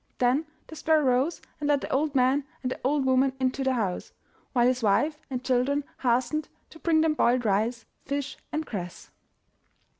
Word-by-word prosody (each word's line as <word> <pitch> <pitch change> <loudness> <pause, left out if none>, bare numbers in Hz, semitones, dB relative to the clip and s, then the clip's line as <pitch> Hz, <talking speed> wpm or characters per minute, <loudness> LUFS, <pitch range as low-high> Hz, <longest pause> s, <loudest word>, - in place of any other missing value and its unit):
Then 255 +6 +2 0.2
the 315 - -11
sparrow 315 -1 +2
rose 260 +5 +1 0.2
and 295 - -2
led 285 -2 +3
the - - -5
old 290 +1 0
man 260 +2 +3 0.2
and 255 - -1
the - - -4
old 275 +1 +1
woman 260 +1 +3
into 260 +1 0
the 265 -1 +1
house, 195 -6 -2 0.4
while 240 -3 +3
his 255 0 +2
wife 290 +9 +2
and 255 -1 -4
children 265 +3 +1 0.2
hastened 255 +5 0 0.2
to 320 - -13
bring 320 -2 +3
them 320 -1 +3
boiled 245 -4 +2
rice, 220 +4 0 0.2
fish, 280 0 -3 0.2
and 310 +1 -2
cress. 180 - -7
265 Hz, 180 wpm, -27 LUFS, 245-290 Hz, 0.4 s, led